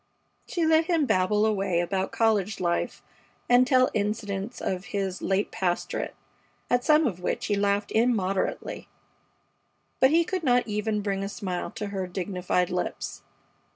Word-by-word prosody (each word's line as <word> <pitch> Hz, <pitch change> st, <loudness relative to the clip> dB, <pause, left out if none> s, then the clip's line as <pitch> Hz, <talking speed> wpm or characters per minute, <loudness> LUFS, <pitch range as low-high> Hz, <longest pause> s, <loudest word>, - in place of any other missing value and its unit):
She 340 Hz, -2 st, 0 dB
let 320 Hz, 0 st, +4 dB
him 330 Hz, -4 st, +2 dB
babble 210 Hz, -1 st, +2 dB
away 195 Hz, -5 st, +1 dB
about 190 Hz, +2 st, -1 dB
college 220 Hz, -2 st, +1 dB
life 175 Hz, -1 st, -1 dB, 0.4 s
and 245 Hz, +1 st, +5 dB
tell 255 Hz, -1 st, +4 dB
incidents 205 Hz, +1 st, -2 dB
of 185 Hz, 0 st, -3 dB
his 195 Hz, -5 st, -3 dB
late 195 Hz, +2 st, 0 dB
pastorate, 175 Hz, -2 st, -2 dB, 0.6 s
at 245 Hz, 0 st, +3 dB
some 305 Hz, +2 st, +5 dB
of 190 Hz, -9 st, -1 dB
which 180 Hz, -, -2 dB
he 205 Hz, -, +1 dB
laughed 200 Hz, 0 st, 0 dB
immoderately; 215 Hz, -5 st, 0 dB, 1.1 s
but 260 Hz, -, +6 dB
he 330 Hz, +3 st, +4 dB
could 370 Hz, +2 st, -3 dB
not 245 Hz, -4 st, +3 dB
even 210 Hz, 0 st, -1 dB
bring 195 Hz, -1 st, -1 dB
a 195 Hz, -, -3 dB
smile 185 Hz, -3 st, -4 dB
to 210 Hz, -2 st, -4 dB
her 190 Hz, -2 st, -3 dB
dignified 180 Hz, -1 st, -1 dB
lips. -, -, -3 dB
205 Hz, 150 wpm, -26 LUFS, 190-245 Hz, 1.1 s, but